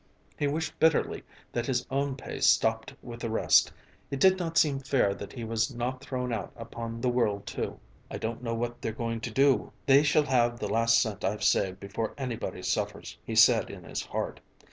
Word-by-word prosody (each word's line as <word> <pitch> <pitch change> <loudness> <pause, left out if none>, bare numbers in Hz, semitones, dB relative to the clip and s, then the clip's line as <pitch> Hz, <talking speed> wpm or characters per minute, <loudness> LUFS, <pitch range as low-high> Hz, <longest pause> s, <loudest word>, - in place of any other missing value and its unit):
He 145 - 0
wished 160 +3 -3
bitterly 160 -1 +2 0.3
that 120 0 -2
his 125 -3 0
own 140 0 0
pay 130 - -7
stopped 110 0 +2
with 120 -1 -8
the 115 - -3
rest; 110 - +4 0.4
it 140 - -3
did 190 +4 +5
not 165 -2 -2
seem 140 -3 +3
fair 135 -7 +1
that 100 - -8
he 120 - -6
was 115 +3 0
not 125 +2 -3
thrown 125 -3 -3
out 110 - -4
upon 115 0 -7
the 125 - +2
world 110 -5 0
too. - - -4 0.3
"I - - -5
don't 115 +2 -4
know 115 -2 -2
what 120 +1 -3
they're 110 - -3
going 115 0 -3
to 115 - -3
do. 135 +4 +2
They 140 +1 +6
shall 150 +1 +3
have 120 -3 +2
the - - -3
last 115 0 +4
cent 105 -4 -2
I've 100 +2 -1
saved 95 -2 +2
before 105 +3 -4
anybody 125 -5 -4
suffers," - - -3
he - - -5
said - - +6
in - - -9
his - - -4
heart. - - -4
120 Hz, 205 wpm, -28 LUFS, 115-135 Hz, 0.4 s, They